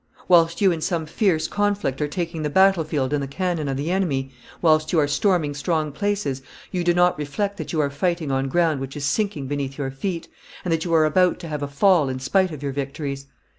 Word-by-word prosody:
Whilst 170 0 +4
you 195 -2 +5
in 165 -2 -3
some 165 -2 -1
fierce 165 0 +1
conflict 205 -9 -1
are 150 - +1
taking 165 +1 -4
the 150 - -1
battle 190 +1 +4
field 145 -3 -2
and 145 - +1
the 140 - -3
cannon 170 0 -2
of 135 -1 -2
the 150 +5 -2
enemy, 140 -9 -1 0.3
whilst 155 -2 +3
you 175 - +1
are 150 -2 +4
storming 160 -2 +1
strong 155 +1 -1
places, 195 -6 -2 0.3
you 180 -1 -1
do 175 - +3
not 175 -2 +3
reflect 200 +8 -2
that - - -5
you 160 - -1
are 140 -1 0
fighting 170 0 -1
on 135 0 0
ground 160 0 +1
which 135 +2 -6
is 145 - -3
sinking 200 -6 -1
beneath 135 -1 -3
your 135 -2 -3
feet, 170 +5 -4 0.4
and 175 - +1
that 160 +1 -1
you 170 - -1
are 155 -1 +5
about 180 +3 +3
to 170 - -7
have 150 -2 -4
a 145 - -2
fall 150 0 +3
in 130 0 -3
spite 185 +9 +2
of 150 -2 -8
your 140 - -1
victories. 140 0 -4
155 Hz, 235 wpm, -23 LUFS, 140-180 Hz, 0.4 s, you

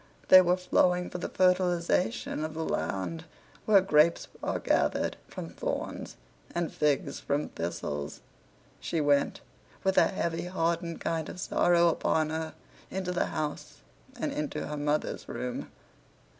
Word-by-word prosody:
They 185 - +11
were 180 0 +2
flowing 180 -1 +2
for 180 - -4
the - - -3
fertilization 175 -8 +1
of 155 0 -4
the 160 0 -2
land 95 - -2 0.4
where 205 -3 +6
grapes 170 -2 +3
are - - -1
gathered - - +1
from - - -7
thorns, - - -4 0.4
and 170 -2 -1
figs 150 -2 0
from 145 +1 -1
thistles. 80 -4 -4 0.6
She 165 - -2
went, 145 -2 +2 0.4
with 190 0 +4
a - - +5
heavy, 170 -2 -2
hardened 170 -1 -1
kind 160 -2 -2
of - - -8
sorrow 175 -1 +3
upon 155 -1 +1
her, 160 0 -3 0.3
into 185 -1 -3
the 180 - 0
house 150 -1 -4 0.4
and - - -1
into 150 -1 -3
her 150 - -4
mother's 150 +1 -1
room. 125 -1 -4
165 Hz, 140 wpm, -29 LUFS, 150-180 Hz, 0.6 s, They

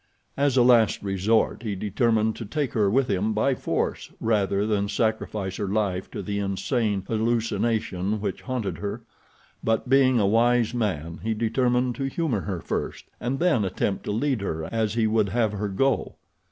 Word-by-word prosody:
As 140 -2 +1
a 125 - +6
last 120 -5 +4
resort 100 +4 +1
he 105 -4 -3
determined 110 +2 +1
to - - -5
take 140 +6 -2
her 105 -3 +2
with 130 +5 +2
him 105 +2 0
by 120 +6 +2
force - - -2
rather 100 -2 +1
than 100 -2 0
sacrifice 105 -2 -1
her 100 - -2
life 95 -2 -1
to - - -6
the 100 -1 -2
insane 100 +1 -1
hallucination 110 -3 0
which 100 -3 -3
haunted 125 -6 -3
her; 105 +3 -4 0.6
but, 115 +2 0
being 130 -2 +5
a 105 - +3
wise 115 +3 +3
man, 85 -9 -2
he 110 +1 -1
determined 125 +2 +1
to 135 - -2
humor 135 - -1
her 95 -4 -4
first - - -4
and 125 +3 -2
then 165 -9 +2
attempt 95 +1 -1
to - - -2
lead 120 +2 0
her 80 -5 -3
as 110 -1 0
he 115 -2 +2
would 110 -2 +2
have 110 +1 +1
her 105 0 -3
go. 135 +8 0
110 Hz, 175 wpm, -25 LUFS, 100-120 Hz, 0.6 s, a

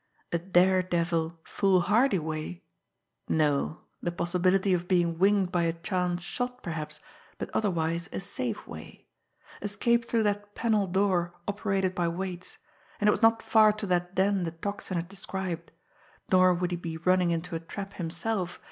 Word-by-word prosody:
a 170 - +1
daredevil, 175 -2 +2
foolhardy 195 +5 +3
way?... 155 - -4 0.7
no, 150 0 +1 0.2
the 175 - -1
possibility 180 +3 +2
of 175 0 -1
being 170 -3 +2
winged 195 -1 +3
by 175 - +2
a 165 -1 +1
chance 180 0 -1
shot, 250 +7 -4
perhaps, 160 -3 -4 0.4
but - - -5
otherwise 170 -4 0
a - - -3
safe 125 -9 -4
way... - - -10 0.6
escape 235 +4 +1
through 230 -1 +1
that 205 0 -2
panel 215 -4 +1
door 180 -2 +1
operated 195 -2 0
by 175 -2 0
weights... 180 +1 -4 0.4
and 210 - +2
it - - +7
was - - -1
not 225 0 +4
far 215 -1 +6
to 215 0 -5
that 180 0 0
den 195 +1 +2
the 170 -2 -2
Tocsin 200 +2 -4
had 170 0 -3
described... 190 -3 -5 0.6
nor 185 0 +6
would 180 0 0
he 175 - -1
be 165 -2 -5
running 180 +1 +3
into 170 0 -2
a - - -1
trap 195 +4 -7
himself 175 +2 -3
180 Hz, 155 wpm, -28 LUFS, 170-200 Hz, 0.7 s, it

